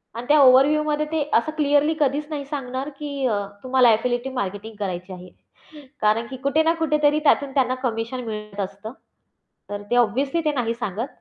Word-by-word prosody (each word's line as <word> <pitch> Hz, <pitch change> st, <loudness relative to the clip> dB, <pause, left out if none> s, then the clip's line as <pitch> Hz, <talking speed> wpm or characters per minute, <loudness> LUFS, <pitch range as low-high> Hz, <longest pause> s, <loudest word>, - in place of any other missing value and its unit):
आणि 235 Hz, -, -6 dB
त्या 295 Hz, +1 st, +5 dB
ओव्हरव्ह्यूमध्ये 295 Hz, +3 st, +4 dB
ते 320 Hz, -1 st, 0 dB
असं 235 Hz, +7 st, +2 dB
क्लिअरली 295 Hz, +1 st, +3 dB
कधीच 290 Hz, +1 st, +1 dB
नाही 290 Hz, -2 st, -4 dB
सांगणार, 270 Hz, -1 st, -4 dB
की 285 Hz, -2 st, -3 dB
अ, 210 Hz, -4 st, 0 dB, 0.2 s
तुम्हाला 255 Hz, -2 st, +4 dB
एफिलिएटिव्ह 245 Hz, +4 st, -2 dB
मार्केटिंग 205 Hz, 0 st, -4 dB
करायची 185 Hz, -1 st, -4 dB
आहे. 180 Hz, 0 st, -11 dB, 0.7 s
कारण 215 Hz, +2 st, +2 dB
की 260 Hz, -, -7 dB
कुठे 280 Hz, +3 st, +2 dB
ना 325 Hz, +1 st, +3 dB
कुठेतरी 300 Hz, -2 st, +2 dB
त्यातून 285 Hz, -2 st, +3 dB
त्यांना 255 Hz, -2 st, +1 dB
कमिशन 235 Hz, +1 st, -2 dB
मिळत 210 Hz, -2 st, -7 dB
असतं. 200 Hz, +3 st, -5 dB, 0.8 s
तर 205 Hz, 0 st, -5 dB
ते 245 Hz, -, +3 dB
ऑब्व्हियसली 270 Hz, +8 st, +1 dB
ते 300 Hz, -, +3 dB
नाही 235 Hz, -4 st, -1 dB
सांगत. 230 Hz, 0 st, -4 dB
255 Hz, 170 wpm, -23 LUFS, 220-290 Hz, 0.8 s, त्या